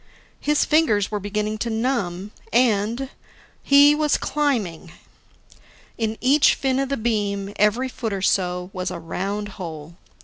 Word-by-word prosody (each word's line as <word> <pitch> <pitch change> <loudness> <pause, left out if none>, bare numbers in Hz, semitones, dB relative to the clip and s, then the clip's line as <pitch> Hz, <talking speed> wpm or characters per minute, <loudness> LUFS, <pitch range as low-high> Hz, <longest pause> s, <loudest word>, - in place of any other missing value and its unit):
His 295 0 +1
fingers 225 -12 +2
were 210 - -1
beginning 210 +2 -3
to 235 - -2
numb. 220 -5 -2 0.2
And 235 +2 +1 0.5
he 285 +1 +6
was 300 0 +1
climbing! 210 - -2 1.0
In 220 -1 -2
each 275 +3 +4
fin 265 -1 0
of 275 -1 -1
the 275 - -1
beam, 205 -3 -2
every 210 +5 +2
foot 235 -3 -5
or 195 -1 -3
so, 180 -1 0
was 185 0 -3
a 180 - -5
round 195 +5 -4
hole. 160 -1 -8
210 Hz, 140 wpm, -22 LUFS, 195-260 Hz, 1.0 s, he